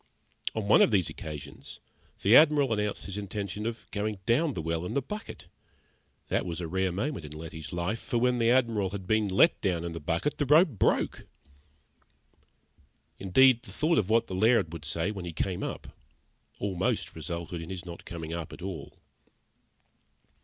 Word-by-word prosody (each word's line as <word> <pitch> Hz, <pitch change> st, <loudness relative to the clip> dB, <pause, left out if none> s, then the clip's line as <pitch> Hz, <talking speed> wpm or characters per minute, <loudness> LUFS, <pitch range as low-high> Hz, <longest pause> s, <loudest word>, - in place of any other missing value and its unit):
On 110 Hz, -2 st, -2 dB
one 105 Hz, -, +6 dB
of -, -, +6 dB
these 95 Hz, -6 st, +2 dB
occasions, 75 Hz, -2 st, -9 dB, 0.4 s
the 105 Hz, +5 st, +6 dB
Admiral 145 Hz, -5 st, +6 dB
announced 105 Hz, -1 st, -2 dB
his 100 Hz, +1 st, -5 dB
intention 100 Hz, +1 st, -4 dB
of 115 Hz, 0 st, -5 dB
going 105 Hz, 0 st, -2 dB
down 140 Hz, +6 st, +2 dB
the 85 Hz, -, -3 dB
well 80 Hz, +1 st, -1 dB
in 90 Hz, -, -4 dB
the -, -, +4 dB
bucket. 210 Hz, +9 st, -7 dB, 0.8 s
That -, -, 0 dB
was 85 Hz, -2 st, -4 dB
a 85 Hz, -, -3 dB
rare 95 Hz, +2 st, 0 dB
moment 100 Hz, -, -3 dB
in 75 Hz, 0 st, -8 dB
Letty's 80 Hz, 0 st, -8 dB
life, 90 Hz, +6 st, -2 dB
for 130 Hz, -4 st, -2 dB
when 125 Hz, +1 st, +2 dB
the 115 Hz, 0 st, +3 dB
Admiral 115 Hz, -6 st, +2 dB
had 95 Hz, -1 st, -6 dB
been 110 Hz, +2 st, +2 dB
let 100 Hz, -, +4 dB
down 90 Hz, -4 st, 0 dB
in 85 Hz, -, -4 dB
the 85 Hz, -, -5 dB
bucket, 85 Hz, -, -1 dB
the 145 Hz, -, +1 dB
rope 160 Hz, +6 st, +6 dB
broke! 110 Hz, -9 st, 0 dB, 1.9 s
Indeed, 120 Hz, +6 st, +5 dB
the -, -, -12 dB
thought 160 Hz, +1 st, +2 dB
of 100 Hz, -, -1 dB
what 115 Hz, +1 st, +3 dB
the -, -, -7 dB
Laird 110 Hz, -3 st, +3 dB
would 80 Hz, -3 st, -7 dB
say 85 Hz, +6 st, -1 dB
when 95 Hz, -4 st, -6 dB
he 85 Hz, -, -5 dB
came 90 Hz, +3 st, -2 dB
up, -, -, -6 dB, 0.6 s
almost 95 Hz, -2 st, -1 dB
resulted 85 Hz, 0 st, -5 dB
in 80 Hz, -, -8 dB
his 95 Hz, -2 st, -6 dB
not 85 Hz, -1 st, -9 dB
coming 80 Hz, -1 st, -6 dB
up 85 Hz, -2 st, -5 dB
at -, -, -10 dB
all. 90 Hz, -7 st, -7 dB
100 Hz, 180 wpm, -29 LUFS, 85-115 Hz, 1.9 s, one